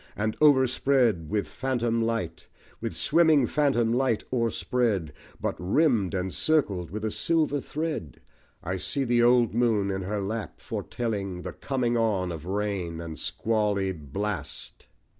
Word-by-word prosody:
And 110 Hz, +1 st, -1 dB
overspread 130 Hz, -, +3 dB
with 105 Hz, -2 st, -1 dB
phantom 120 Hz, -3 st, -1 dB
light 115 Hz, -8 st, -2 dB, 0.3 s
(With -, -, -4 dB
swimming 160 Hz, -4 st, +4 dB
phantom 120 Hz, -5 st, +2 dB
light 125 Hz, -3 st, +1 dB
o'erspread, 115 Hz, -, 0 dB, 0.3 s
But -, -, -2 dB
rimmed 105 Hz, -, +2 dB
and 95 Hz, 0 st, -2 dB
circled 100 Hz, -, +1 dB
with 105 Hz, +2 st, -4 dB
a 110 Hz, -, -1 dB
silver 155 Hz, -1 st, +1 dB
thread) 150 Hz, -, -4 dB, 0.4 s
I 95 Hz, +2 st, -2 dB
see 135 Hz, +9 st, -1 dB
the 120 Hz, -1 st, +2 dB
old 120 Hz, -1 st, +4 dB
moon 110 Hz, -4 st, +2 dB
in 95 Hz, 0 st, -2 dB
her 105 Hz, +3 st, -2 dB
lap, 105 Hz, +2 st, -4 dB
foretelling 100 Hz, -6 st, -4 dB
The -, -, -5 dB
coming 125 Hz, -3 st, -1 dB
on 100 Hz, -6 st, +1 dB
of 80 Hz, -1 st, -7 dB
rain 95 Hz, -4 st, -2 dB
and 80 Hz, -2 st, -7 dB
squally 105 Hz, -3 st, 0 dB
blast. 95 Hz, +5 st, -5 dB
110 Hz, 140 wpm, -27 LUFS, 95-125 Hz, 0.4 s, swimming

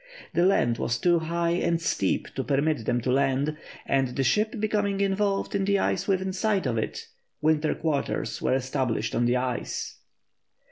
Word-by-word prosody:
The 170 Hz, +2 st, +3 dB
land 120 Hz, -11 st, +2 dB
was 120 Hz, -, 0 dB
too 175 Hz, +6 st, +3 dB
high 170 Hz, +1 st, -1 dB
and 170 Hz, -1 st, +1 dB
steep 100 Hz, -, -1 dB
to 135 Hz, -, -2 dB
permit 140 Hz, -3 st, 0 dB
them 120 Hz, -, +1 dB
to 125 Hz, -, 0 dB
land, 135 Hz, +3 st, +1 dB, 0.3 s
and 135 Hz, -1 st, +2 dB
the 135 Hz, -, +1 dB
ship, 210 Hz, -, +1 dB
becoming 205 Hz, -2 st, 0 dB
involved 200 Hz, 0 st, 0 dB
in 200 Hz, -1 st, +1 dB
the 200 Hz, +1 st, +2 dB
ice 190 Hz, -1 st, 0 dB
within 190 Hz, -1 st, 0 dB
sight 195 Hz, -1 st, 0 dB
of 125 Hz, -3 st, 0 dB
it, 110 Hz, -, -4 dB, 0.3 s
winter 155 Hz, 0 st, +2 dB
quarters 150 Hz, -4 st, -2 dB
were -, -, +2 dB
established 130 Hz, -4 st, -1 dB
on 120 Hz, -, +1 dB
the 125 Hz, +1 st, +2 dB
ice. 125 Hz, -1 st, -3 dB
155 Hz, 175 wpm, -26 LUFS, 130-195 Hz, 0.3 s, The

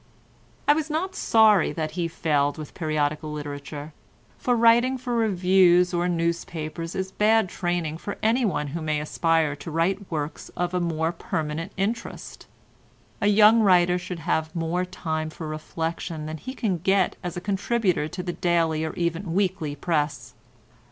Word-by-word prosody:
I 290 Hz, -, +7 dB
was 315 Hz, 0 st, -2 dB
not 345 Hz, +5 st, -2 dB
sorry 220 Hz, -, +4 dB
that 155 Hz, -2 st, -3 dB
he 170 Hz, 0 st, -2 dB
failed 145 Hz, -3 st, 0 dB
with 155 Hz, -2 st, -8 dB
periodical 155 Hz, -1 st, -1 dB
literature, 145 Hz, 0 st, -6 dB, 0.5 s
for 245 Hz, -, +1 dB
writing 235 Hz, +3 st, +4 dB
for 250 Hz, -1 st, -4 dB
reviews 185 Hz, -4 st, +4 dB
or 175 Hz, +1 st, +1 dB
newspapers 165 Hz, -1 st, -3 dB
is 190 Hz, 0 st, -3 dB
bad 215 Hz, -1 st, +3 dB
training 175 Hz, -4 st, -2 dB
for 200 Hz, -, -5 dB
one 220 Hz, -, +1 dB
who 165 Hz, +4 st, -4 dB
may 155 Hz, -1 st, 0 dB
aspire 160 Hz, 0 st, +1 dB
to 165 Hz, -, -8 dB
write 185 Hz, +5 st, -1 dB
works 150 Hz, -1 st, -4 dB
of 175 Hz, 0 st, -1 dB
more 165 Hz, -1 st, 0 dB
permanent 160 Hz, -1 st, -4 dB
interest. 220 Hz, +4 st, -4 dB, 0.7 s
A 205 Hz, -, +3 dB
young 210 Hz, +2 st, +6 dB
writer 180 Hz, -4 st, +4 dB
should 180 Hz, 0 st, -6 dB
have 160 Hz, 0 st, -1 dB
more 170 Hz, +2 st, -1 dB
time 160 Hz, -3 st, -3 dB
for 155 Hz, +1 st, -7 dB
reflection 160 Hz, +1 st, -4 dB
than 155 Hz, +1 st, -5 dB
he 260 Hz, -, -7 dB
can 195 Hz, -9 st, -1 dB
get 190 Hz, +1 st, +2 dB
as 175 Hz, 0 st, -4 dB
a -, -, -1 dB
contributor 195 Hz, -3 st, 0 dB
to 180 Hz, +3 st, -6 dB
the 175 Hz, -1 st, -3 dB
daily 165 Hz, -3 st, +1 dB
or 160 Hz, -, -3 dB
even 170 Hz, +1 st, -2 dB
weekly 185 Hz, -6 st, 0 dB
press. 145 Hz, -5 st, -2 dB
175 Hz, 155 wpm, -25 LUFS, 155-195 Hz, 0.7 s, I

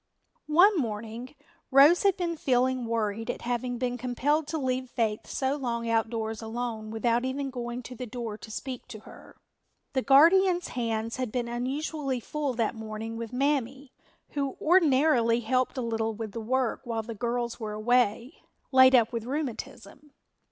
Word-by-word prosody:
One 360 Hz, +7 st, +5 dB
morning 230 Hz, +2 st, -5 dB, 0.3 s
Rose 285 Hz, +6 st, +7 dB
had 395 Hz, -3 st, +3 dB
been 345 Hz, -2 st, -2 dB
feeling 255 Hz, -3 st, +1 dB
worried 225 Hz, 0 st, -2 dB
at -, -, -4 dB
having 245 Hz, +1 st, -2 dB
been 245 Hz, 0 st, -2 dB
compelled 285 Hz, +5 st, 0 dB
to 320 Hz, +1 st, -2 dB
leave 255 Hz, -2 st, -2 dB
Faith 225 Hz, -4 st, -1 dB
so 270 Hz, 0 st, -1 dB
long 235 Hz, -4 st, -3 dB
outdoors 225 Hz, -1 st, -1 dB
alone 225 Hz, -1 st, -4 dB
without 230 Hz, +2 st, 0 dB
even 270 Hz, +1 st, -3 dB
going 240 Hz, 0 st, -5 dB
to 250 Hz, -, -8 dB
the 250 Hz, 0 st, -6 dB
door 230 Hz, -2 st, -5 dB
to 220 Hz, -, -11 dB
speak 255 Hz, +3 st, -6 dB
to 215 Hz, -, -9 dB
her. -, -, -15 dB, 0.6 s
The 260 Hz, -, +1 dB
guardian's 345 Hz, +7 st, +5 dB
hands 230 Hz, -1 st, -2 dB
had 255 Hz, -4 st, -3 dB
been 240 Hz, 0 st, -2 dB
unusually 270 Hz, +3 st, -2 dB
full 285 Hz, +1 st, -3 dB
that 230 Hz, -1 st, 0 dB
morning 220 Hz, 0 st, -6 dB
with 230 Hz, -1 st, -6 dB
Mammy, 270 Hz, 0 st, -1 dB, 0.4 s
who 280 Hz, -2 st, -3 dB
ordinarily 280 Hz, -8 st, +4 dB
helped 255 Hz, +2 st, 0 dB
a -, -, -1 dB
little 225 Hz, -1 st, -1 dB
with 220 Hz, -1 st, -5 dB
the 230 Hz, -, -5 dB
work 255 Hz, +1 st, 0 dB
while 230 Hz, -3 st, -3 dB
the 230 Hz, +1 st, -6 dB
girls 235 Hz, +2 st, -2 dB
were 215 Hz, -2 st, -4 dB
away, 235 Hz, +2 st, +1 dB, 0.3 s
laid 260 Hz, 0 st, +7 dB
up 235 Hz, -1 st, +3 dB
with 230 Hz, -1 st, -3 dB
rheumatism. 275 Hz, 0 st, -6 dB
245 Hz, 165 wpm, -28 LUFS, 230-270 Hz, 0.6 s, Rose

